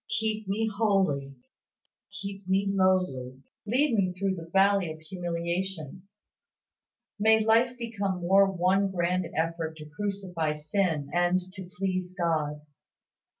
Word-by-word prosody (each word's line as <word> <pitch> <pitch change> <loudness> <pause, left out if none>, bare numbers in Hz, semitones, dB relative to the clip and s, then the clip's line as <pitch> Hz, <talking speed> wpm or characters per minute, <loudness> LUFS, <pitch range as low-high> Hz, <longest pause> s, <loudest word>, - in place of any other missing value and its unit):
Keep 220 -1 -1
me 215 +3 0
holy. 195 -11 +1 0.8
Keep 195 0 -7
me 190 +1 +2
lowly. 180 -10 +1 0.2
Lead 260 +5 +2
me 195 -4 +2
through 195 0 0
the 165 -2 -8
valley 195 -2 +3
of 155 - -9
humiliation. 175 +1 -4 1.1
May 220 +1 +4
life 235 +3 +3
become 200 -6 -3
more 195 +2 +5
one 190 +2 +2
grand 180 -1 0
effort 165 0 -1
to 155 - -9
crucify 180 -2 -2
sin 150 -1 -1
and 175 +1 +3
to 190 -2 -8
please 185 -1 -2
God. 155 -4 0
185 Hz, 120 wpm, -28 LUFS, 165-200 Hz, 1.1 s, more